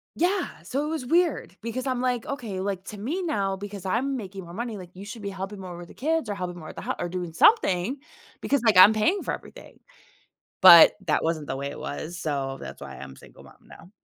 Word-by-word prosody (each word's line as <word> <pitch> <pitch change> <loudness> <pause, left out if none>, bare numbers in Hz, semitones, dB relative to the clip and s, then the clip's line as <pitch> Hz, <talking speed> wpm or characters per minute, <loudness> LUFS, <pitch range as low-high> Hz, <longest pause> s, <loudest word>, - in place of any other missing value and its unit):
Yeah, 360 - -1
so 265 - -2
it - - -3
was 310 -6 -4
weird 335 - +1
because 240 +4 -4
I'm, 255 -2 -1
like, 250 -2 -1
"Okay" 230 -9 -4
like, 190 -1 -3
to 210 - -8
me, 310 - -3
now 200 - -1
because 200 -1 -8
I'm 250 +8 0
making 195 -5 -7
more 170 0 -11
money, 230 +2 -4
like, 180 -2 -11
"you 195 +2 -9
should 215 +1 -9
be 200 - -3
helping 195 +1 -6
more 185 -2 -8
with 175 0 -10
the - - -14
kids 315 -3 -1
or 205 - -2
helping 180 -2 -5
more 155 - -10
with - - -10
the - - -7
hou - - -2
or 175 - -2
doing 175 -2 -5
something, 205 - +3 0.4
because, 280 -3 0
like, 225 -4 +4
I'm 185 +4 +10
paying 220 - +1
for - - -2
everything." - - -11 0.8
But, 170 -3 +10 0.2
that 150 - +2
wasn't 160 -2 -1
the - - -3
way 140 +1 -4
it - - -9
was, 170 +4 -6
so 135 -4 -2
that's - - -9
why - - -8
I'm 70 -1 -9
a - - -17
single - - -16
mom - - -16
now. 170 - -15
200 Hz, 245 wpm, -25 LUFS, 175-255 Hz, 0.8 s, I'm